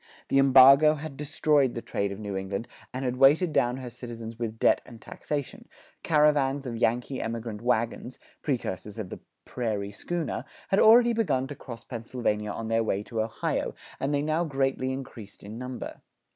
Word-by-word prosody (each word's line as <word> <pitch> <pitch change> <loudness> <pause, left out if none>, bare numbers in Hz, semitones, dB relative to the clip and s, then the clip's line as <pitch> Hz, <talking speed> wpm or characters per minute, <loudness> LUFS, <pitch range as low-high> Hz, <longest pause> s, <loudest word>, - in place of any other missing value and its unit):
The 135 - +4
embargo 135 +3 +7
had 150 -1 -7
destroyed 145 -2 +1
the 115 - -3
trade 100 0 -2
of 100 - -6
New 100 -2 -5
England, 95 +3 -3 0.2
and 130 +1 -4
had 125 0 -1
weighted 150 +5 +5
down 125 -1 +2
her 125 -2 -7
citizens 115 -1 -8
with 115 -2 -3
debt - - +3
and 115 -2 -13
taxation; 145 +2 -5 0.3
caravans 145 -3 +2
of 120 -2 -4
Yankee 120 +4 0
emigrant 115 -2 -4
wagons, 120 +1 -1 0.2
precursors 105 - -3
of 105 -5 -5
the - - -7 0.3
"prairie 105 -5 -3
schooner," 155 - -3 0.3
had 195 - +3
already 235 +2 +7
begun 190 - +1
to 145 +2 -7
cross 115 -3 -9
Pennsylvania 115 -3 -3
on 110 +2 -4
their 115 0 +2
way 100 -2 -1
to 115 0 -3
Ohio; 110 0 -2 0.2
and 135 - -1
they 145 0 +1
now 155 +3 +1
greatly 135 -3 -1
increased 120 -6 -8
in 105 +3 -8
number. 125 0 -7
125 Hz, 170 wpm, -27 LUFS, 115-140 Hz, 0.3 s, embargo